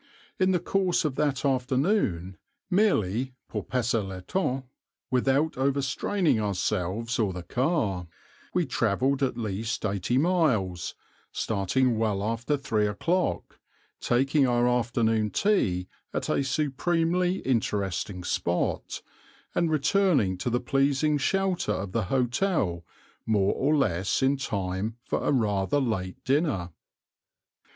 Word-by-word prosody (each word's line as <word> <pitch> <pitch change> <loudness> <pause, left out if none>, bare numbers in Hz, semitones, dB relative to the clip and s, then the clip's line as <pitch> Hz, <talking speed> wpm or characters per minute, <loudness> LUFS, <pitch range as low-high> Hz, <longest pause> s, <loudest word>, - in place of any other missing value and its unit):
In 185 0 +3
the 180 - +2
course 180 -1 +1
of 150 - 0
that 145 -2 0
afternoon, 130 - +1 0.4
merely 130 - +1
pour 105 -3 -4
passer 120 +2 0
le 95 -2 -7
temps, 135 - -1 0.5
without 135 +5 +2
overstraining 140 - +1
ourselves 105 +3 -1
or 105 -4 +2
the 90 -1 -6
car, 105 - 0 0.4
we - - +1
travelled 130 +7 +1
at 135 - 0
least 110 0 -3
eighty 100 +4 0
miles, 130 - +1 0.4
starting 110 +4 0
well 105 -3 0
after 115 +6 -1
three 110 -6 0
o'clock, 170 - -1 0.4
taking 135 +3 +2
our 120 0 +2
afternoon 115 -3 +1
tea 95 - +1 0.3
at - - -2
a - - +2
supremely 165 +6 +1
interesting 100 -6 -1
spot, 85 0 -1 0.5
and 170 - +1
returning 155 - +2
to 90 +7 -3
the 120 +1 +1
pleasing 140 +3 +1
shelter 190 - 0
of 95 -2 -4
the 110 0 0
hotel 125 - 0 0.4
more 100 -3 +2
or 145 +4 +1
less 100 - +1
in 135 +1 +3
time 100 -3 -3
for - - -2
a - - +2
rather 110 +1 +1
late 95 -8 -2
dinner. 135 - 0
125 Hz, 120 wpm, -27 LUFS, 100-145 Hz, 0.5 s, In